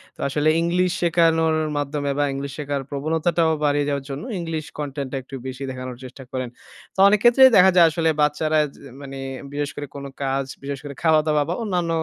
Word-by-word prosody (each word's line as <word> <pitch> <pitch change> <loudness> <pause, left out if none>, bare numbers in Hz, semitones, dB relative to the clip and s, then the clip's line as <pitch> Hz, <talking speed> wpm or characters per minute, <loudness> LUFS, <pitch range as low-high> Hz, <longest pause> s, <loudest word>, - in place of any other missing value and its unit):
তো - - -32
আসলে 150 +2 +1
ইংলিশ 180 +1 +1
শেখানোর 165 -1 +3 0.2
মাধ্যমে 145 0 -2
বা - - +3
ইংলিশ 140 0 -5
শেখার 145 -1 -2
প্রবণতাটাও 160 +3 0
বাড়িয়ে 145 0 +2
যাওয়ার 140 -1 -2
জন্য, 135 - -5 0.2
ইংলিশ 160 -2 -4
কনটেন্টটা 140 -2 -4
একটু 135 - -9
বেশি 130 +1 -6
দেখানোর 130 -1 -6
চেষ্টা 130 +1 -10
করেন। 130 -2 -3 0.5
তো - - -8
অনেক 205 0 +4
ক্ষেত্রেই 260 +2 +8
দেখা 190 +1 +7
যায়, 175 - +8
আসলে 165 0 +1
বাচ্চারা 155 +1 +2 0.2
যে - - -18 0.2
মানে 135 -1 -8 0.4
বিশেষ 145 0 -2
করে 145 -1 -6
কোন 140 0 -7 0.2
কাজ, 135 0 -1 0.2
বিশেষ 140 -1 -4
করে 145 -1 -7
খাওয়া-দাওয়া 155 -2 +3
বা - - 0
অন্যান্য 180 -5 -1
150 Hz, 185 wpm, -22 LUFS, 140-165 Hz, 0.5 s, ক্ষেত্রেই